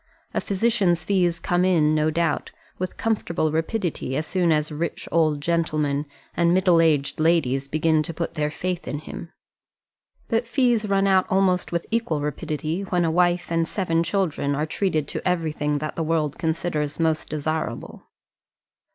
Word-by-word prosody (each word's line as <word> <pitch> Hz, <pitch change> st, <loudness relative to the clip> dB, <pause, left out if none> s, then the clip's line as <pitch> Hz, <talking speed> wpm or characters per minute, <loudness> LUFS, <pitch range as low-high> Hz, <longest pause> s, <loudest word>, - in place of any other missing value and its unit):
A -, -, 0 dB
physician's 195 Hz, -5 st, +1 dB
fees 175 Hz, -4 st, +1 dB
come 175 Hz, +2 st, +1 dB
in, 160 Hz, -5 st, +3 dB
no 155 Hz, 0 st, +2 dB
doubt, 165 Hz, -1 st, 0 dB, 0.3 s
with 185 Hz, 0 st, -4 dB
comfortable 170 Hz, -8 st, 0 dB
rapidity 160 Hz, -, -2 dB
as 155 Hz, -, -1 dB
soon 175 Hz, -2 st, +1 dB
as 150 Hz, 0 st, +1 dB
rich 155 Hz, +2 st, -4 dB
old 155 Hz, -3 st, +2 dB
gentlemen 150 Hz, -3 st, 0 dB, 0.3 s
and 170 Hz, +1 st, +3 dB
middle 180 Hz, -3 st, +4 dB
aged 150 Hz, -4 st, +1 dB
ladies 145 Hz, -5 st, +2 dB
begin 155 Hz, +2 st, +2 dB
to 155 Hz, -, -4 dB
put 170 Hz, -, -3 dB
their 150 Hz, -2 st, -1 dB
faith 180 Hz, +3 st, -4 dB
in 145 Hz, -, -2 dB
him; 165 Hz, +3 st, -8 dB, 1.0 s
but 230 Hz, 0 st, 0 dB
fees 240 Hz, -4 st, +2 dB
run 195 Hz, 0 st, +3 dB
out 190 Hz, -1 st, +3 dB
almost 190 Hz, -2 st, +2 dB
with 170 Hz, -1 st, -1 dB
equal 225 Hz, -10 st, 0 dB
rapidity 155 Hz, +3 st, -3 dB
when 180 Hz, -3 st, 0 dB
a 160 Hz, -, +1 dB
wife 175 Hz, +1 st, +2 dB
and 165 Hz, 0 st, +1 dB
seven 165 Hz, -4 st, 0 dB
children 170 Hz, -6 st, 0 dB
are 150 Hz, +2 st, 0 dB
treated 155 Hz, -3 st, -1 dB
to -, -, -4 dB
everything 155 Hz, -4 st, 0 dB
that 155 Hz, +1 st, -4 dB
the -, -, -2 dB
world 155 Hz, -2 st, -1 dB
considers 160 Hz, -2 st, -2 dB
most 160 Hz, -1 st, 0 dB
desirable. 155 Hz, -5 st, -3 dB
165 Hz, 160 wpm, -24 LUFS, 155-180 Hz, 1.0 s, middle